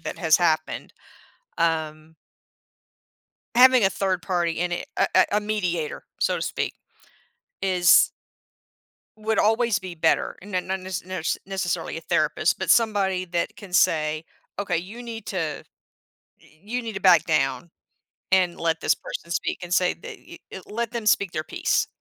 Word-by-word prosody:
that - - -6
has 160 -2 +4
happened. 160 -3 0 0.7
Um 160 -1 -1 1.4
having 255 -2 +7
a 195 - +5
third 190 -2 -1
party 175 -3 0
in 175 +1 -2
it 175 - -3
a - - +3
a, 185 - +7
a 210 - +4
mediator, 180 -7 -2 0.2
so - - +1
to - - -5
speak, - - -2 0.9
is 180 -3 +5 1.1
would 220 +1 0
always 225 +1 +3
be 185 -2 -7
better. 160 0 +1
N 200 -1 -7
n 180 - -1 0.2
nes 185 -3 -4
nurse 185 -3 -2
necessarily 190 -3 -3
a - - -7
therapist, - - +1
but - - -4
somebody 200 -5 +2
that 170 -1 -2
can 195 -4 -12
say, 155 -2 +2 0.3
"Okay, 195 -4 -1
you 210 +8 -7
need 225 -1 -7
to 190 - -3
eh, 155 -4 -3 0.8
you 210 +11 -6
need 225 -2 -6
to 195 - -5
back 175 -4 +6
down 135 -1 0 0.6
and 180 -2 +2
let 165 -1 0
this - - +3
person 170 - -8
speak," - - -2
and 175 0 -4
say 180 -1 +3
that - - -10 0.3
eh, 190 - -7
"Let 230 +1 -3
them 235 -3 -4
speak 200 -3 +3
their 155 -1 -3
peace." - - 0
180 Hz, 160 wpm, -24 LUFS, 165-205 Hz, 1.4 s, having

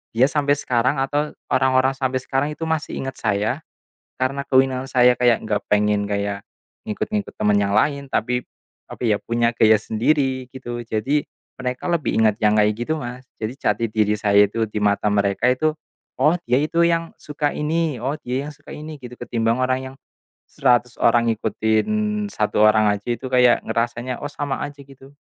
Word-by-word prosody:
dia 130 +3 +5
sampai 145 -1 +2
sekarang 130 -1 0
atau 145 +2 -1 0.2
orang-orang 130 0 +3
sampai 130 -1 -1
sekarang 140 +3 -1
itu 165 - -6
masih 160 -1 -2
ingat 135 0 -6
saya, 110 +5 0 0.6
karena 135 +2 -1
keunikan 130 0 +3
saya 125 0 +5
kayak 120 -2 +4
nggak 105 -1 0
pengen 105 0 +2
kayak 100 0 -2 0.4
ngikut-ngikut 205 - -3
teman 105 -1 +3
yang 100 0 0
lain, 140 +3 +1
tapi 125 +3 0 0.5
tapi 115 -4 0
ya - - -2
punya 115 0 0
gaya 110 -2 +5
sendiri, 130 +3 0
gitu. 120 -2 -6
Jadi, 115 +7 0 0.3
mereka 125 -1 -4
lebih 170 -9 0
ingat 110 -2 +4
yang 105 0 +4
kayak 105 0 +3
gitu 140 +7 -2
Mas. 125 0 -7 0.2
Jadi, 110 +2 -3
jati 105 +2 0
diri 105 -1 +1
saya 100 -1 +5
itu 115 +1 -1
di 105 0 -4
mata 100 0 +1
mereka 100 +2 +1
itu, 155 +4 +1 0.5
oh 150 +5 +4 0.2
dia 125 - +4
itu 165 +2 +1
yang 165 0 -1
suka 150 0 -2
ini, 155 -3 -1
oh 140 +4 -2
dia 130 +4 -3
yang - - -6
suka - - -13
ini 155 0 -8
gitu. 125 0 -9
Ketimbang 115 0 0
orang 130 0 +1
yang - - -17 0.5
100 125 -2 +1
orang 115 0 +4
ngikutin 110 0 0 0.5
1 105 0 +1
orang 110 0 +4
aja 100 0 -7
itu 125 +3 -6
kayak 125 -1 +5
ngerasanya, 120 +2 -2
oh 145 - -5
sama 145 -1 -3
aja 145 -1 -10
gitu. 135 0 -16
125 Hz, 175 wpm, -21 LUFS, 110-140 Hz, 0.6 s, dia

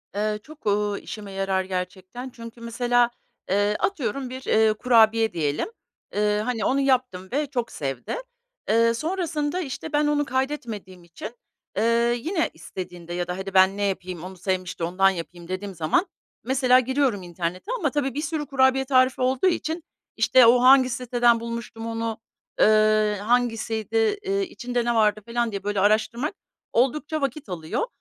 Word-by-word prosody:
Eee, 210 +1 -1
çok, 310 +1 -15
ııı, 205 0 +1
işime 205 -2 -8
yarar 195 -1 0
gerçekten. 185 +6 -5
Çünkü 230 -1 -11
mesela, 240 +1 +2 0.4
eee, 205 +2 +2
atıyorum 270 - -1
bir, 260 +1 -7
eee, 220 0 +4
kurabiye 225 -1 +4
diyelim, 150 - -1 0.5
ııı, 210 0 +2
hani, 230 0 -2
onu 270 - +2
yaptım 255 -9 0
ve 290 +2 0
çok 245 -4 -3
sevdi. 135 -3 -4 0.5
Eee, 230 +1 +4
sonrasında, 320 +1 -2
işte, 300 +1 -6
ben 295 0 +3
onu 295 0 +1
kaydetmediğim 240 -9 -3
için, 210 +7 -9 0.4
eee, 235 +2 +3
yine 330 +1 0
istediğinde 175 +1 -8
ya 175 0 -2
da 180 +1 -3
"Hadi, 190 0 -6
ben 190 +1 +5
ne 205 - -1
yapayım? 185 -3 -3
Onu 185 0 -8
sevmişti. 185 -1 -3
Ondan 185 +3 +3
yapayım." 170 -1 -7
dediğim 190 +2 -4
zaman 165 - +1 0.4
mesela 255 0 +4
giriyorum 260 -5 0
internete 175 - -4
ama 295 -6 0
tabii 275 -3 -1
bir 290 - -2
sürü 305 -1 -2
kurabiye 265 -1 +3
tarifi 255 -1 +3
olduğu 260 +6 +2
için, 335 -2 -1 0.3
işte, 255 -2 +6
o 245 +2 +6
hangi 260 0 +7
siteden 240 -1 +2
bulmuştum 230 -1 -6
onu, 225 -1 -3 0.4
ııı, 215 0 +4
hangisiydi, 225 -1 0 0.3
eee, 395 0 0
içinde 245 -8 -3
ne 240 0 +1
vardı 215 -1 +3
falan 235 0 0
diye 200 -1 -5
böyle 205 -1 -1
araştırmak 225 - +1 0.4
oldukça 295 +5 +1
vakit 275 0 -3
alıyor. 175 - -3
230 Hz, 155 wpm, -24 LUFS, 195-260 Hz, 0.5 s, hangi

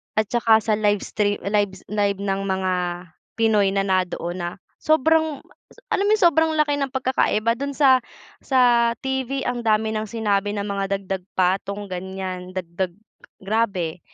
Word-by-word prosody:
at 215 -1 0
saka 225 -2 +4
sa 215 -1 +1
livestrea 205 0 0
live 205 -1 0 0.2
live 200 -2 0
ng 195 0 -1
mga 190 -1 0 0.6
Pinoy 215 -3 +3
na 195 - +2
na'doon 180 -2 -1
na 175 0 -2 0.3
sobrang 315 -1 +2
ma - - -24 0.2
sa - - -19
alam 400 - +1
mo - - +3
'yong 425 - -1
sobrang 320 0 +2
laki 295 -1 +2
ng 275 -1 -2
pagkakaiba 235 -4 +1
do'n 280 0 -3
sa 265 -3 +5 0.4
sa 240 -3 +3
TV, 265 0 -2
ang 245 -1 -1
dami 220 0 +2
ng 215 0 -2
sinabi 205 -2 0
na 200 - -2
mga 195 0 -1
dagdag 190 -1 -4
patong, 195 +2 0
ganyan. 185 0 -5
Dagdag 175 0 -3 0.5
grabe 195 -6 -1
210 Hz, 155 wpm, -22 LUFS, 190-250 Hz, 0.6 s, sa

